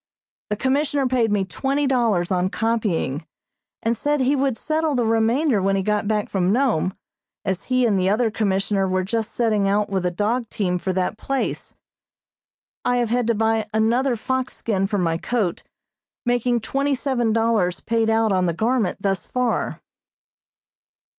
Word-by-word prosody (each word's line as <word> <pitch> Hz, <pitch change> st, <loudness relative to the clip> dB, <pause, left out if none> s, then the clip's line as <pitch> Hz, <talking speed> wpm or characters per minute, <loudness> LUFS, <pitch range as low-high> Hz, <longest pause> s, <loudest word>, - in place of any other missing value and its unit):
The 210 Hz, -, 0 dB
Commissioner 275 Hz, +3 st, 0 dB
paid 245 Hz, -4 st, +1 dB
me 200 Hz, -2 st, +1 dB
twenty 275 Hz, +8 st, -1 dB
dollars 230 Hz, -10 st, +1 dB
on 185 Hz, 0 st, +1 dB
copying, 200 Hz, -, -1 dB, 0.6 s
and 230 Hz, +1 st, +1 dB
said 295 Hz, +5 st, 0 dB
he 265 Hz, +2 st, +2 dB
would 270 Hz, -3 st, 0 dB
settle 310 Hz, +1 st, 0 dB
the 245 Hz, -2 st, +1 dB
remainder 225 Hz, +2 st, +2 dB
when 195 Hz, +1 st, +1 dB
he 195 Hz, -, 0 dB
got 210 Hz, +1 st, 0 dB
back 210 Hz, -1 st, 0 dB
from 185 Hz, -1 st, 0 dB
Nome, 220 Hz, -, +1 dB, 0.5 s
as 190 Hz, -1 st, -2 dB
he 255 Hz, -1 st, +2 dB
and 205 Hz, -4 st, +2 dB
the 185 Hz, +1 st, +2 dB
other 220 Hz, +2 st, +2 dB
Commissioner 195 Hz, -2 st, 0 dB
were 185 Hz, 0 st, 0 dB
just 220 Hz, +3 st, -2 dB
setting 215 Hz, -4 st, +1 dB
out 205 Hz, +1 st, +1 dB
with 190 Hz, -2 st, 0 dB
a 180 Hz, -, +1 dB
dog 215 Hz, +6 st, -1 dB
team 180 Hz, -3 st, -1 dB
for 190 Hz, -, -2 dB
that 185 Hz, +3 st, -1 dB
place. 275 Hz, -1 st, -3 dB, 1.1 s
I 245 Hz, -, +1 dB
have 240 Hz, -2 st, 0 dB
had 245 Hz, -1 st, +1 dB
to 235 Hz, -, +2 dB
buy 220 Hz, 0 st, +1 dB
another 240 Hz, +4 st, +2 dB
fox 260 Hz, +3 st, -2 dB
skin 195 Hz, -4 st, 0 dB
for 205 Hz, 0 st, -1 dB
my 165 Hz, -3 st, 0 dB
coat, 210 Hz, -7 st, -1 dB, 0.6 s
making 245 Hz, 0 st, +1 dB
twenty 275 Hz, +5 st, 0 dB
seven 250 Hz, -4 st, 0 dB
dollars 220 Hz, -6 st, +1 dB
paid 230 Hz, -1 st, 0 dB
out 225 Hz, -1 st, +2 dB
on 185 Hz, -1 st, +2 dB
the 170 Hz, -, 0 dB
garment 220 Hz, -1 st, 0 dB
thus 195 Hz, -1 st, -1 dB
far. 250 Hz, -2 st, -1 dB
225 Hz, 170 wpm, -22 LUFS, 195-245 Hz, 1.1 s, he